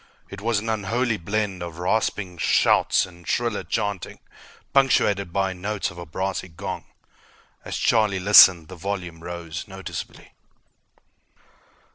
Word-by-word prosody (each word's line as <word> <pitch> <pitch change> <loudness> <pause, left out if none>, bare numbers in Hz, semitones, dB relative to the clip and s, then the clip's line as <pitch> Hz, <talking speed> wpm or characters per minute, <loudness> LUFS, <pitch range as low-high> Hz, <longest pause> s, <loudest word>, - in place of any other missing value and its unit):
It 100 - -8
was 115 +1 +1
an 105 +2 -3
unholy 110 +2 0
blend 100 0 -2
of 85 -2 -7
rasping 90 -1 -1
shouts - - +3
and 85 -2 -16
shriller 120 -3 -1
chanting, 100 -3 -3 0.6
punctuated 105 -9 +3
by 95 0 0
notes 100 +2 -3
of 85 - -11
a 85 - -8
brassy 95 +4 -3
gong. 95 +3 -6 0.8
As - - -4
Charlie 105 -3 +2
listened, 90 -4 +7
the 95 - -10
volume 90 -2 -5
rose 85 0 -6
noticeably. 95 -1 -8
95 Hz, 125 wpm, -24 LUFS, 90-105 Hz, 0.8 s, listened